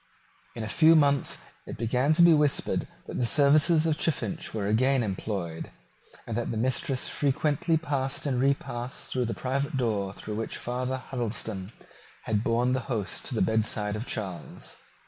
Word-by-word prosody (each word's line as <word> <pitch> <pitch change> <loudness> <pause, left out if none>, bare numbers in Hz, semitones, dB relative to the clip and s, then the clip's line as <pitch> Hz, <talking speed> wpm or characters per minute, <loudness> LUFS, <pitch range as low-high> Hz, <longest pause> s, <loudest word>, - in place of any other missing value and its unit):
In 115 - -4
a - - -3
few 160 +8 +5
months 140 -3 +3 0.3
it - - -7
began 125 +5 +1
to 170 - +5
be 170 -1 +8
whispered 150 -2 +2 0.2
that - - -5
the 125 - +2
services 155 +4 +5
of 160 -1 0
Chiffinch 165 +1 -1
were 105 -3 -3
again 125 +5 +2
employed, 95 -5 -4 0.6
and 115 - -4
that 120 - -2
the 115 - -3
mistress 130 +2 0
frequently 150 +3 +1
passed 140 -4 -2
and 130 -3 0
repassed 130 -2 -2
through 125 -1 0
that 115 - -4
private 135 +3 -2
door 105 -6 0
through 105 +1 -7
which 115 - -3
Father 125 +2 -3
Huddleston 110 -6 -4 0.5
had 105 -1 0
borne 120 +2 +1
the 130 - +1
host 110 -6 -3
to 130 - -4
the - - +2
bedside 105 -1 0
of 110 +4 -5
Charles. 95 -8 -6
125 Hz, 165 wpm, -27 LUFS, 110-140 Hz, 0.6 s, be